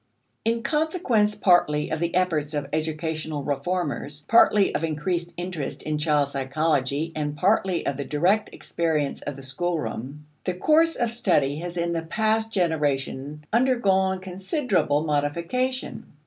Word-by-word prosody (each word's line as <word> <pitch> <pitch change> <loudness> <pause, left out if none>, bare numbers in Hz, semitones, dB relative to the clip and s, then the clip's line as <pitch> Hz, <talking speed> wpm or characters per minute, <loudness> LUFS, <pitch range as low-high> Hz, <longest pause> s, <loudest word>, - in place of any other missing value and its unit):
In 230 +1 0
consequence 300 - +1
partly 150 -5 +3
of 160 - -1
the 170 +1 -1
efforts 160 -5 +1
of 145 -1 -2
educational 155 -1 -2
reformers, 145 0 -2
partly 210 -3 +5
of - - -1
increased 170 +2 -1
interest 175 -5 -4
in 155 -1 -2
child 150 -2 +2
psychology, 140 +2 0
and 150 -1 -3
partly 190 -1 +2
of 140 - -1
the 140 - -2
direct 180 +10 +1
experience 155 -4 -2
of 145 - -5
the 135 - -10
schoolroom, 140 -2 -3 0.2
the 185 - -2
course 320 - +3
of 240 -2 0
study 150 - +1
has 175 +2 -5
in 170 0 0
the 165 -1 -1
past 220 +6 0
generation 150 -5 -1
undergone 195 -7 +2
considerable 185 - 0
modification. 170 - -2
165 Hz, 135 wpm, -25 LUFS, 150-195 Hz, 0.2 s, partly